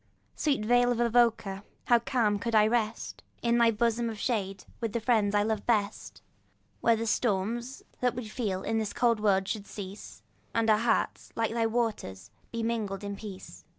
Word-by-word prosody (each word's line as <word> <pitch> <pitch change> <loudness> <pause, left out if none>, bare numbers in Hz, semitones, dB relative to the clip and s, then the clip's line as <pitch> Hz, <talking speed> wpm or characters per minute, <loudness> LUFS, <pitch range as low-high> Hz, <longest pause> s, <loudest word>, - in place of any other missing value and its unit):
Sweet 275 -8 0
vale 245 +1 +4
of 240 - -1
Avoca! 230 -4 +2 0.2
how 240 -1 +5
calm 225 -4 +1
could 230 +2 -1
I 215 -1 +6
rest 225 0 -1 0.2
In 235 0 +3
thy 235 -1 +6
bosom 230 +1 +1
of 220 - -6
shade, 195 -5 -2
with 230 -3 -3
the 235 - 0
friends 215 -3 +2
I 205 - +4
love 215 -1 -2
best, 210 -3 -1 0.6
Where 230 - +4
the 225 +1 -3
storms 230 +3 -1 0.2
that 250 0 +1
we 245 -2 -5
feel 210 -5 -3
in 225 0 0
this 215 -2 -3
cold 235 -2 +2
world 195 -2 +2
should 205 -2 -4
cease, 200 0 -9 0.3
And 225 -1 +3
our 215 - +4
hearts, 235 +1 0
like 225 -1 0
thy 230 -1 +1
waters, 225 - -2 0.2
be 230 -1 -3
mingled 215 -4 -2
in 200 0 -4
peace. 200 -2 -10
225 Hz, 185 wpm, -29 LUFS, 205-235 Hz, 0.6 s, I